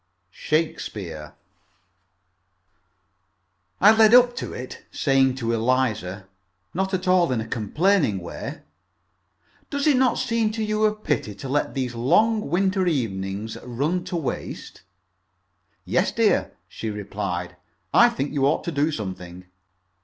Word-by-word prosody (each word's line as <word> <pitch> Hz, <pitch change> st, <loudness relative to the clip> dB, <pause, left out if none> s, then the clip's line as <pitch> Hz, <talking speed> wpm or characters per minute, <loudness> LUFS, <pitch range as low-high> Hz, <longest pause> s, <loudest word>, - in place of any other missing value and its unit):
SHAKESPEARE 95 Hz, -, -3 dB, 2.4 s
I 205 Hz, +3 st, +8 dB
led 220 Hz, +1 st, +7 dB
up 245 Hz, -1 st, +6 dB
to -, -, -4 dB
it, 125 Hz, +1 st, -8 dB
saying 135 Hz, -2 st, +2 dB
to 115 Hz, -3 st, -2 dB
Eliza, 110 Hz, -6 st, 0 dB, 0.5 s
not 190 Hz, +2 st, -1 dB
at 185 Hz, 0 st, -4 dB
all 180 Hz, -5 st, +4 dB
in 125 Hz, -, 0 dB
a 110 Hz, -, -4 dB
complaining 140 Hz, -, +1 dB
way, 85 Hz, -2 st, -7 dB, 1.1 s
"Does 285 Hz, 0 st, -2 dB
it 295 Hz, -4 st, +4 dB
not 255 Hz, -2 st, +3 dB
seem 230 Hz, -4 st, 0 dB
to 220 Hz, 0 st, -2 dB
you 215 Hz, 0 st, +1 dB
a 215 Hz, 0 st, +2 dB
pity 145 Hz, -, -2 dB
to 120 Hz, -, -8 dB
let 145 Hz, +2 st, -1 dB
these 130 Hz, -2 st, -2 dB
long 210 Hz, -, +2 dB
winter 190 Hz, +2 st, +1 dB
evenings 105 Hz, -, -2 dB
run 145 Hz, +9 st, -1 dB
to 180 Hz, -, -4 dB
waste?" 155 Hz, -6 st, -5 dB, 1.0 s
"Yes, -, -, +1 dB
dear," -, -, +1 dB
she 110 Hz, -, -6 dB
replied; 100 Hz, -4 st, -4 dB, 0.4 s
"I -, -, +7 dB
think 140 Hz, +3 st, -3 dB
you 140 Hz, -2 st, +2 dB
ought -, -, +1 dB
to 170 Hz, -, -3 dB
do 150 Hz, +1 st, +1 dB
something." 90 Hz, -, -6 dB
135 Hz, 130 wpm, -24 LUFS, -, 2.4 s, I